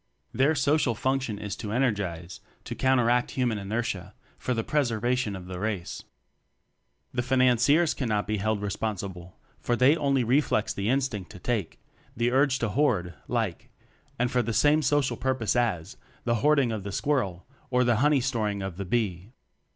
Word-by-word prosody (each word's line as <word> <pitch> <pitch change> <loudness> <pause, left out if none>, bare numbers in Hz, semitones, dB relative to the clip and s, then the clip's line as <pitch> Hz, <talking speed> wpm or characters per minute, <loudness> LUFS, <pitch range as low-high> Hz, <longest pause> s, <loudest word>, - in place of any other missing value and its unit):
Their 140 +5 +3
social 140 -3 +2
function 130 -3 -1
is 105 -1 -5
to 105 -4 -5
energize 100 -8 -1 0.2
to - - -5
counteract 125 -2 +2
human 120 -5 -1
inertia 100 -2 -3 0.2
for 125 - -2
the 115 - -1
preservation 120 -5 0
of 90 -1 -8
the 90 0 -6
Race. 100 -4 -4 1.1
The 120 - 0
Financiers 130 +5 +3
cannot 110 -6 -1
be 110 +1 -1
held 105 0 -1
re 100 - -2
sponsible, 95 -4 -5 0.2
for 120 - 0
they 130 +5 +5
only 140 -5 +1
reflex 120 -3 +1
the 100 +2 -2
in 135 +2 +3
stinct 105 -9 -4
"to 100 - -11
take," 110 -3 -2 0.4
the 120 +1 +1
urge 135 +1 +3
to 115 - -1
hoard, 105 -8 +1
like - - -2 0.5
and 125 +1 0
for 125 -2 +2
the 115 -1 -2
same 150 +6 +4
social 135 -4 +1
pur 130 +2 0
pose 110 -4 -1
as 105 -7 -1 0.3
the 115 -1 +1
hoarding 140 -4 +3
of 110 -2 -3
the 100 - -5
squir 145 +7 +1
rel 95 -6 -5 0.2
or 125 0 +3
the 120 -2 +2
honey 145 +2 +3
storing 110 -6 -1
of 95 -3 -5
the 100 - -4
bee. 100 0 -2
120 Hz, 175 wpm, -27 LUFS, 100-130 Hz, 1.1 s, they